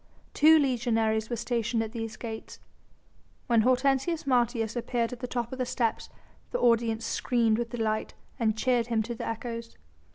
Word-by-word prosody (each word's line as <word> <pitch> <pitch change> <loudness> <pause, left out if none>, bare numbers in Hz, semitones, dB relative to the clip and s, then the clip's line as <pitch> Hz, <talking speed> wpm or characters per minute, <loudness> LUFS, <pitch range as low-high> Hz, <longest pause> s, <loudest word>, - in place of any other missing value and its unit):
Two 315 +2 +7
legionaries 225 -5 +1
were 240 - -1
stationed 235 0 -1
at 220 - -6
these 225 -2 -5
gates. 225 -2 -7 0.9
When 235 -2 +4
Hortensius 270 +6 +1
Martius 240 -3 +1
appeared 235 -1 -1
at 245 - -8
the 250 - -4
top 240 -1 -3
of 260 - -6
the 255 - +1
steps 235 -2 -1 0.4
the - - -2
audience 230 -1 +2
screamed 230 -2 +1
with 235 -1 -2
delight 220 -2 -2 0.2
and 220 -2 +1
cheered 240 -1 +1
him 225 -2 +1
to 235 +2 -5
the 230 - -5
echoes. 230 0 -5
235 Hz, 165 wpm, -28 LUFS, 225-250 Hz, 0.9 s, Two